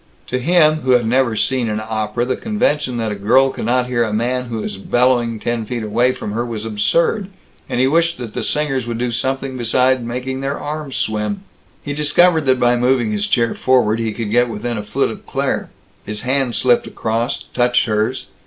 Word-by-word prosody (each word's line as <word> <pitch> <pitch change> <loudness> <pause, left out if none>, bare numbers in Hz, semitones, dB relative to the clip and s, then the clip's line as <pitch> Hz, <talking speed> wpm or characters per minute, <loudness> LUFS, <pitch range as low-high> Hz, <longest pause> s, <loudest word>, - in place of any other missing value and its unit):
To 125 - -1
him, 155 +2 +4
who 130 -4 +1
had 120 -2 +3
never 120 0 +2
seen 125 +1 0
an 105 0 -2
opera, 110 +2 -2
the 130 - -1
convention 150 - -1
that 110 -2 -1
a - - -3
girl 130 +7 +3
cannot 125 +2 0
hear 125 -1 0
a 110 - -2
man 125 +4 -1
who 115 -3 -4
is 105 - -5
bellowing 120 0 +1
ten 120 0 -2
feet 115 +1 -4
away 120 +4 +2
from 105 - -6
her, 115 +3 -1
was 115 -3 -5
absurd; 165 - +1 0.4
and - - -1
he 130 - +4
wished 165 +4 +2
that 115 -4 -7
the - - -3
singers 135 -5 0
would 115 -1 -3
do 120 0 -1
something 130 +2 -2
besides 125 +2 +2
making 125 +3 -4
their 140 +1 -2
arms 150 -2 -5
swim. 110 - -2 0.4
He 145 - -4
discovered 155 +1 +3
that 130 -1 +3
by 120 0 +3
moving 125 -2 +2
his 105 0 -1
chair 115 -2 +1
forward, 120 -4 +2
he 115 -1 -1
could 110 -1 -4
get 120 +1 +3
within 115 +2 -3
a - - -5
foot 105 - -1
of - - -11
Claire. - - -2 0.3
His 105 0 -4
hand 130 -1 0
slipped 125 -2 +2
across, 115 +4 -2
touched 120 0 +2
hers. 110 +3 -1
125 Hz, 205 wpm, -18 LUFS, 115-130 Hz, 0.4 s, him